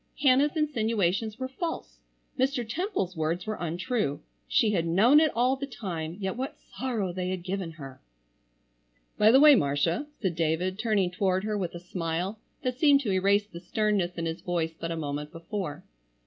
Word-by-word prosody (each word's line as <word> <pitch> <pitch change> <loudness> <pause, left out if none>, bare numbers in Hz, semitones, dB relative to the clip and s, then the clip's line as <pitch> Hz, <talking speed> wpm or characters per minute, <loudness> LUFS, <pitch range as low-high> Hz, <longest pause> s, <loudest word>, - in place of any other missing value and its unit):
Hannah's 280 +3 +4
insinuations 220 - 0
were 260 0 -3
false. 325 +6 -5 0.4
Mr. 260 -3 0
Temple's 230 - -2
words 165 +3 -1
were 215 0 -4
untrue. 175 - -1 0.3
She 220 - +3
had 170 -5 0
known 220 - +6
it 310 -2 +3
all 250 +3 +3
the 275 +1 -5
time, 175 - -5
yet 190 -2 -2
what 260 +3 -4
sorrow 225 -8 -3
they 180 0 -2
had 185 -2 -3
given 185 -2 -3
her! 135 -4 -10 1.2
"By 210 - +7
the 260 +4 +7
way, 300 0 +9
Marcia," 165 - +1
said 190 -5 0
David, 170 +4 -1
turning 210 -5 +1
toward 185 0 0
her 215 0 -1
with 180 -4 -3
a - - -5
smile 175 +3 -3 0.2
that 250 0 -2
seemed 285 -2 +6
to 220 -7 -1
erase 200 +2 +3
the 170 -5 -10
sternness 190 -1 0
in 165 - -2
his 165 0 -3
voice 165 -2 -1
but 165 +1 -6
a 165 - -3
moment 150 -1 -4
before. 170 -2 -5
190 Hz, 175 wpm, -28 LUFS, 170-240 Hz, 1.2 s, way